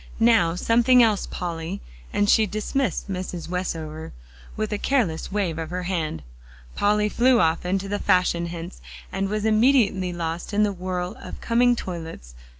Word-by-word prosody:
Now 225 -8 +4
something 235 +5 +4
else, 215 -3 +1
Polly," 170 +2 -4 0.3
and 205 - +1
she 215 +1 +4
dismissed 215 - -2
Mrs. 180 -3 -5
Westover 160 - -4 0.4
with 215 0 -2
a 205 - -2
careless 215 -14 0
wave 185 -6 -1
of 160 -1 -4
her 180 +1 -4
hand. 165 - -2 0.5
Polly 210 +1 +2
flew 245 +3 +3
off 165 0 +1
into 195 +1 -1
the 205 +1 -2
fashion 175 -1 +2
hints, 170 +1 -8 0.3
and 195 0 -2
was 210 +1 -2
immediately 215 -5 +3
lost 170 +3 -4
in 210 - +4
the 205 -1 +1
whirl 180 +1 -4
of - - -8
coming 245 +1 +3
toilets. 165 - -7
190 Hz, 155 wpm, -24 LUFS, 170-215 Hz, 0.5 s, Now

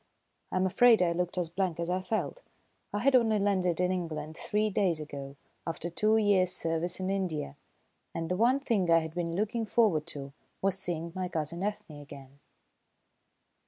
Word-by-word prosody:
I - - -3
am 185 0 +2
afraid 225 +2 +5
I 170 - +2
looked 175 +1 -2
as 170 -2 -1
blank 180 -2 -1
as 170 - -1
I 180 +1 0
felt. 220 - -2 0.5
I - - -2
had 270 +2 +4
only 225 -3 +4
landed 185 -4 +1
in 180 0 +2
England 160 -4 -4
three 210 +4 0
days 185 -5 +1
ago, 140 -2 -7 0.3
after 165 +1 -3
two 215 +5 +3
years' 200 -4 +3
service 165 +1 -2
in 185 +1 -1
India, 175 - -2 0.6
and 165 0 -3
the 180 - 0
one 240 +7 +3
thing 215 -10 0
I 165 - +7
had 160 0 -6
been 170 -1 -2
looking 215 +4 -1
forward 195 -10 +2
to 140 -4 -6 0.3
was 195 -1 +1
seeing 170 -2 -3
my 185 -1 -2
cousin 165 +1 -3
Ethne 195 -7 -4
again. 140 -1 -12
180 Hz, 180 wpm, -30 LUFS, 165-205 Hz, 0.6 s, I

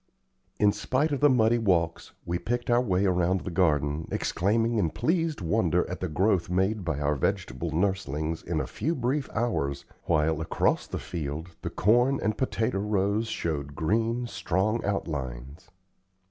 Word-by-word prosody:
In 105 -1 +4
spite 140 +8 0
of 140 - 0
the 145 - +5
muddy 120 -2 +3
walks, 90 -6 0
we 85 0 -1
picked 120 +6 -2
our 120 +1 +5
way 100 -5 +1
around 90 0 +2
the 95 - -5
garden, 75 -3 +1
exclaiming 115 +5 +1
in 85 -5 +2
pleased 165 - 0
wonder 85 - +1
at - - -5
the - - -2
growth 95 +3 +1
made 95 +3 +1
by 80 -4 -2
our 75 0 +1
vegetable 85 +2 -2
nurslings 80 -3 -1
in 80 -2 -2
a - - -1
few 165 +4 -2
brief 135 +3 -1
hours, 70 - -1 0.2
while, 80 +1 +1
across 80 - 0
the - - -4
field, 80 0 -5
the - - -3
corn 120 +6 +3
and 105 +1 0
potato 110 -5 -1
rows 105 +2 0
showed 75 -8 -3
green, 115 +8 0
strong 110 -1 -1
outlines. 70 -6 -4
95 Hz, 160 wpm, -27 LUFS, 80-115 Hz, 0.2 s, the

